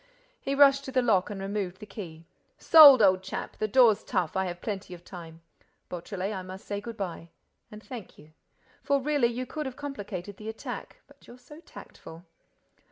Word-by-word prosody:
He 275 - -3
rushed 275 -1 +5
to 265 - -6
the 255 -1 +2
lock 200 -6 +2
and 205 -2 -6
removed 195 -2 -4
the 210 - -10
key. 170 -6 -10 0.3
"Sold, 285 -8 +9
old 185 -1 +4
chap!—The 195 +2 -5
door's 225 -1 +4
tough.—I 185 0 -1
have 175 -1 -5
plenty 195 -3 -5
of 175 - -16
time—Beautrelet, 175 +3 -8
I 190 - -4
must 185 +1 -10
say 205 0 -4
good 230 +1 -8
bye. 170 -3 -6 0.4
And 210 +1 -12
thank 245 -8 -10
you!—For 155 - -5
really 285 -2 +1
you 240 +2 -4
could 300 +3 -5
have 260 - -7
complicated 205 -9 -7
the 215 +1 -7
attack—but 220 - -9
you're 240 - -13
so 295 +5 -14
tactful!" 165 - -13
205 Hz, 165 wpm, -27 LUFS, 185-255 Hz, 0.4 s, Sold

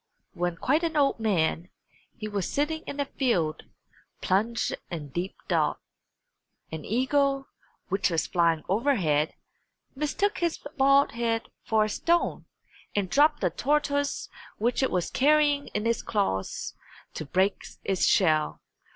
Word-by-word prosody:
When 175 0 -1
quite 290 - +1
an 325 -2 0
old 275 -4 +3
man, 180 -5 0 0.5
he 215 - -5
was 200 -4 -2
sitting 315 +2 0
in 285 - -5
a 285 - +1
field, 185 - -1 0.5
plunged 220 +5 0 0.2
in 155 -5 -6
deep 175 +7 -4
thought. - - +1 0.9
An 160 -1 -5
eagle, 275 +3 +1 0.4
which 195 +2 +1
was 165 -2 0
flying 170 -3 +2
overhead, 185 - +1 0.6
mistook 305 +9 0
his 340 -2 0 0.2
bald 275 0 +4
head 230 -1 -1
for 220 -1 +2
a - - -1
stone 340 +10 0 0.5
and 195 -3 0
dropped 295 +2 +4
the 180 -4 +1
tortoise 285 0 0 0.3
which 240 +5 +1
it 265 - +2
was 180 -2 -1
carrying 290 0 +3
in 210 +1 -3
its 230 0 +1
claws 195 - -2 0.4
to - - -5
break 190 +6 +1 0.2
its 195 -2 +1
shell. 155 -5 +3
225 Hz, 135 wpm, -27 LUFS, 180-285 Hz, 0.9 s, bald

